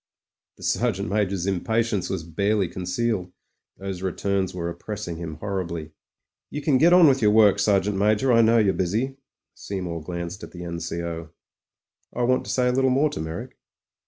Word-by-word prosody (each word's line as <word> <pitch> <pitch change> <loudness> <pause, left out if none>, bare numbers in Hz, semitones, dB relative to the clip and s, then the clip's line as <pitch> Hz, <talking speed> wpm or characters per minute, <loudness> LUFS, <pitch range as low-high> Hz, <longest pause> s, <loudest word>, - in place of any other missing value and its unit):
The - - -13
Sergeant 105 -4 0
Major's 100 -3 0
impatience 105 +2 0
was 80 - -3
barely 100 +4 0
con 90 +2 -6
cealed; 95 -1 -1 0.5
those 95 -2 -5
returns 95 0 -1
were 85 -2 -4
oppressing 85 +1 -5
him 80 -2 -6
horribly. 85 -3 -4 0.6
"You 150 - -5
can 140 -3 +3
get 170 +4 +6
on 175 -2 +8
with 135 -2 +3
your 105 - +5
work, 105 -2 +5
Sergeant 100 -1 +2
Major. 105 +5 +3
I 115 - +6
know 115 +1 +4
you're 105 -4 +3
busy." 115 +9 -1 0.4
Seymour 90 -4 -5
glanced 85 +3 -5
at - - -10
the 90 -1 -7
N.C.O. 85 -1 -4 0.9
"I 125 - 0
want 130 +1 +2
to - - -4
say 125 -1 +2
a - - +3
little 130 +1 +2
more 140 +4 +2
to - - -5
Meyrick." 80 +1 -6
100 Hz, 175 wpm, -24 LUFS, 85-115 Hz, 0.9 s, on